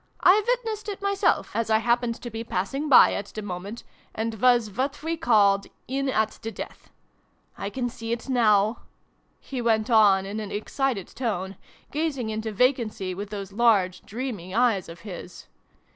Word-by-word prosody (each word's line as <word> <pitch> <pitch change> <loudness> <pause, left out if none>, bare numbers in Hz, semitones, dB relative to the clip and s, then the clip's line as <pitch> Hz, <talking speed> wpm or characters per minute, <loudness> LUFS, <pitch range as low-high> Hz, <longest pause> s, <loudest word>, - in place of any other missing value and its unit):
1 400 +4 +6
witnessed 450 -4 -1
it 400 - -5
myself, 400 0 +1
as 230 -1 0
I 220 - +5
hap 235 +2 +2
pened 235 -1 -3
to 240 - -6
be 225 +1 -5
passing 270 +9 -2
by 265 - +8
at 200 - -4
the 215 - -7
moment, 200 +4 -6 0.3
and 220 -1 -3
was 240 -4 +4
what 275 +7 -3
we 330 +1 -1
called 200 -11 +3
' - - -43
in 275 0 0
at 220 -4 0
the 225 0 -4
death.' - - -9 0.7
I 200 - -4
can 245 +4 -2
see 230 -1 -6
it 235 +2 -3
now! 220 -3 +3 0.3
" - - -42
he 260 -3 -5
went 225 0 +1
on 200 -4 +5
in 205 +2 -4
an 210 -2 -6
excited 225 0 -2
tone, 200 -6 -3 0.4
gazing 285 -7 -2
into 220 0 -3
vacancy 215 -5 0
with 200 +2 -6
those 200 -2 -6
large 205 -5 +3
dreamy 215 -6 -5
eyes 230 -7 +2
of 165 0 -10
his. 180 -2 -9
225 Hz, 180 wpm, -25 LUFS, 200-255 Hz, 0.7 s, by